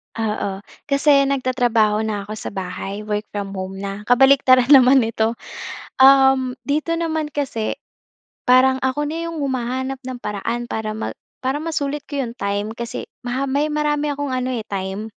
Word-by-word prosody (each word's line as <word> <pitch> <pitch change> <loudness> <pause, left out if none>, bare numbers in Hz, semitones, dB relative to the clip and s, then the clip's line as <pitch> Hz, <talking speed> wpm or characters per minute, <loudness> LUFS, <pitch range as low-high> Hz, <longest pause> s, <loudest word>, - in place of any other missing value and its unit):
Oo, 210 -3 -2 0.2
kasi 280 0 +4
nagtatrabaho 245 -5 +2
na 210 -2 -2
ako 215 +2 -7
sa - - -7
bahay, 195 +2 -5
work 210 0 -3
from 200 -1 -3
home 190 0 -5
na. 200 +1 -6
Kabaliktaran 255 0 +5
naman 265 -1 +7
ito, 225 0 0 0.7
uhm, 265 -1 +6
dito 310 +3 0
naman 320 -2 -1
kasi 275 -7 -3 0.7
parang 260 +1 +4
ako 265 +3 0
na 300 - -4
'yong 335 -1 -5
humahanap 260 -1 -2
ng 255 -1 -6
paraan 230 +2 -3
para 220 -2 -3
ma 215 +1 -4 0.2
para 270 +4 -2
masulit 295 -3 -2
ko 285 - -3
'yong 240 -3 -3
time. 205 0 -2
Kasi 235 0 -5 0.2
maha 255 +3 -2
may 285 +3 0
marami 295 0 0
akong 285 -2 -3
ano 255 0 -1
eh, 230 -4 -3
time. 195 +2 -4
255 Hz, 160 wpm, -21 LUFS, 215-275 Hz, 0.7 s, naman